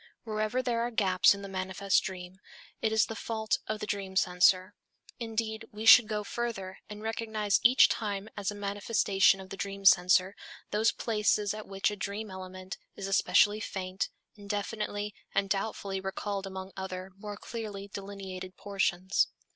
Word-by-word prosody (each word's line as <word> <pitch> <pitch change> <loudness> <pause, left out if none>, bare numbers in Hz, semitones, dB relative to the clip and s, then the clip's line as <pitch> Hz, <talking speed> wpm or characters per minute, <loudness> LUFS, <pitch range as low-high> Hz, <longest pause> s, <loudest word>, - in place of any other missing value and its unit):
Wherever 215 +3 -1
there 235 -2 0
are 240 - 0
gaps 195 -4 +4
in 200 - -9
the - - -5
manifest 190 +1 0
dream, 185 0 -7 0.4
it 220 - +1
is 220 0 +4
the 225 - -6
fault 220 -1 -1
of 215 0 -2
the 210 - -3
dream 200 -3 -4
censor. 185 +1 +3 0.5
Indeed, 225 -1 -3
we 215 +1 -6
should 240 -1 +9
go 210 -1 -2
further, 200 -4 -4
and 210 0 -8
recognize 220 -2 0
each 250 +3 +7
time 205 -2 -2
as 205 -2 -2
a 205 - -4
manifestation 200 -1 +2
of 190 0 -11
the 195 - -6
dream 195 0 -5
censor, 185 +1 +5 0.4
those 215 +2 +3
places 210 -2 +1
at 215 0 -8
which 195 +1 0
a - - -4
dream 205 +1 -4
element 185 0 -8 0.2
is 195 - -5
especially 205 +1 +4
faint, 190 -2 -3 0.2
indefinitely 205 0 -3 0.2
and 195 0 +1
doubtfully 195 -1 -2
recalled 195 +1 -3
among 190 0 -7
other, 190 -1 -6
more 205 0 -7
clearly 210 -4 -6
delineated 195 -2 -7
portions. 190 -2 +1
200 Hz, 160 wpm, -30 LUFS, 190-215 Hz, 0.5 s, should